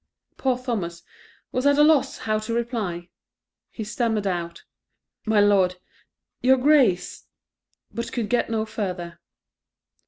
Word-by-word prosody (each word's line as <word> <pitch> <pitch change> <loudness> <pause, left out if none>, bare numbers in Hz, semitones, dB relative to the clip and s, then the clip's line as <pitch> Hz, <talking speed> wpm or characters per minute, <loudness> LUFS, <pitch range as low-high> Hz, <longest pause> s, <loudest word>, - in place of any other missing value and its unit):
Poor 260 -2 0
Thomas 205 -10 -4 0.5
was 255 +2 0
at 285 0 +4
a 295 - +6
loss 300 -3 +3
how 215 -1 -1
to 225 +2 -4
reply; 215 -8 -3 0.6
he 220 - -6
stammered 220 -1 -1
out, 175 -3 -3 0.6
"My 220 -1 +3
Lord 195 -3 +4 0.7
your 260 +1 +5
Grace," 255 -9 +2 0.7
but 235 0 -4
could 235 -4 -2
get 245 0 0
no 220 -1 -1
further. 180 -6 -5
220 Hz, 125 wpm, -24 LUFS, 185-250 Hz, 0.7 s, a